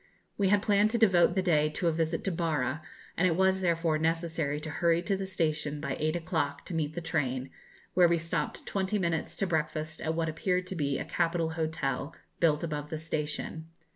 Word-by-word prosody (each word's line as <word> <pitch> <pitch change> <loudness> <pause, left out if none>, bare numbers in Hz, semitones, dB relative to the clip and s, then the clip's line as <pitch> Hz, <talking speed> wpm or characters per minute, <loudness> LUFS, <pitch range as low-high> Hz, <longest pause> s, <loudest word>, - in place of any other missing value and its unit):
We 200 - +2
had 205 +1 +3
planned 205 0 +4
to 235 - +1
devote 185 -7 +5
the 190 - +2
day 155 -4 +3
to 170 +3 -2
a - - +4
visit 165 0 -1
to 195 - 0
Barra, 155 -4 -1 0.3
and 185 - +3
it 165 - +2
was, 190 +1 +3
therefore, 165 -3 +1
necessary 160 -2 0
to 155 - -5
hurry 170 +2 +2
to 195 +3 +1
the 195 0 -4
station 155 -4 -1
by 140 -3 -3
eight 155 +2 0
o'clock 160 -4 -2
to - - -6
meet 155 -2 -1
the 175 - -3
train, 135 -5 -1 0.4
where 180 -1 +6
we 170 0 +3
stopped 165 -1 -3
twenty 195 +1 0
minutes 170 -4 -1
to - - 0
breakfast 155 -2 -2
at 160 0 -1
what 165 0 0
appeared 180 +3 0
to 190 - -5
be 140 -4 0
a - - -4
capital 165 -1 0
hotel, 160 -2 -2 0.2
built 155 -2 +3
above 150 -2 -3
the 160 - -3
station. 155 0 -3
165 Hz, 205 wpm, -30 LUFS, 155-175 Hz, 0.4 s, where